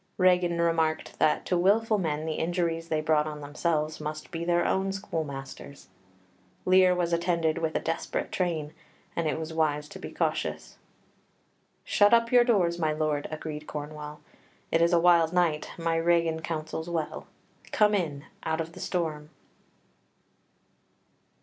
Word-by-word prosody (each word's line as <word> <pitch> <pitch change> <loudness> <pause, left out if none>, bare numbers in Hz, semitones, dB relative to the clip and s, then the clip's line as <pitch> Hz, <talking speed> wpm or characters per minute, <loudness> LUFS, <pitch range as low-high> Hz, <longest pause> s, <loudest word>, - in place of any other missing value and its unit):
Regan 180 -2 +3
remarked 165 -2 0
that 155 - +2
to 180 - 0
wilful 210 +4 +3
men 155 -3 -2
the 160 - -2
injuries 165 -1 -1
they 155 -2 0
brought 155 -1 +2
on 150 -1 -6
themselves 155 +1 -1
must 155 0 -6
be 165 -1 -4
their 175 0 +2
own 190 0 +1
schoolmasters; 140 - -6 0.8
Lear 185 0 +5
was 175 -1 0
attended 170 -2 +1
with 160 -1 -2
a - - +2
desperate 165 0 -3
train, 160 -5 -2 0.4
and 165 -1 0
it 155 - -1
was 160 0 -5
wise 150 -2 0
to - - -10
be - - -7
cautious. - - -2 1.0
"Shut 205 +3 +5
up 230 0 +1
your 245 -1 +7
doors, 180 -8 +2
my 155 -2 +1
lord," 155 -1 -1
agreed 155 -1 -6
Cornwall; 150 0 -7 0.5
"it's 170 +1 +3
a 170 - +5
wild 170 -1 +4
night; 170 -4 +1
my 165 -1 0
Regan 165 -1 +2
counsels 160 0 -4
well. 165 -3 -3 0.4
Come 210 -1 +4
in, 155 -7 -1 0.2
out 160 0 -2
of 165 0 -3
the - - -11
storm." 155 -4 -3
165 Hz, 150 wpm, -28 LUFS, 155-175 Hz, 1.0 s, your